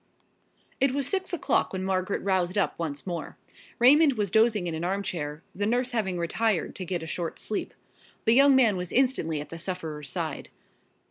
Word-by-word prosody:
It 270 -1 +3
was 280 -1 0
six 380 +4 -1
o'clock 350 - +1
when 185 0 -3
Margaret 190 0 -1
roused 185 -1 0
up 200 - +1
once 150 -4 -4
more. 175 -3 -5 0.4
Raymond 285 +4 +6
was 205 -5 -2
dozing 220 -4 +3
in 170 - -3
an 160 +1 -4
armchair, 170 -5 -3
the 205 +1 -1
nurse 245 +3 0
having 200 -7 -1
retired 175 +2 0
to 185 - -5
get 175 -2 -3
a - - -5
short 165 +1 -4
sleep. 215 - -4 0.5
The 225 - +5
young 275 +2 +6
man 230 -7 +4
was 180 -1 -5
instantly 245 - +1
at 150 - -9
the 165 - -7
sufferer's 160 -5 -4
side. - - -4
190 Hz, 185 wpm, -27 LUFS, 170-240 Hz, 0.5 s, Raymond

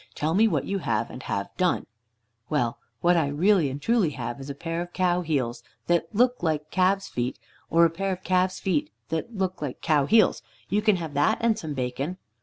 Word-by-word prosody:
Tell 155 +2 0
me 215 +5 +5
what - - 0
you 200 0 -1
have, 115 - -1
and 125 - -8
have 100 -5 -4
done." 180 -1 +1 0.6
"Well, 140 -3 0 0.2
what 175 +1 +4
I 160 -4 +2
really 165 +2 +3
and 135 +2 -5
truly 225 0 +2
have 120 0 -4
is 135 +1 -8
a 140 - -4
pair 165 +3 -3
of 175 0 -7
cow 180 -1 +2
heels 130 -8 -1 0.2
that 170 -1 +2
look 245 +3 +2
like 155 -3 -1
calves' 190 +2 +2
feet, 125 +1 -3 0.3
or 170 +1 +5
a 165 - +2
pair 195 +3 -2
of 185 0 -5
calves' 185 0 +1
feet 175 -6 0 0.2
that 165 +9 -3
look 185 -3 -2
like 145 -4 -4
cow 150 -4 +2
heels. 220 +4 +4 0.3
You 205 +2 +2
can 215 -2 +4
have 165 -4 -5
that 145 +10 +3
and 230 -1 +2
some 155 -6 -5
bacon." 135 +7 -3
170 Hz, 210 wpm, -26 LUFS, 145-190 Hz, 0.6 s, me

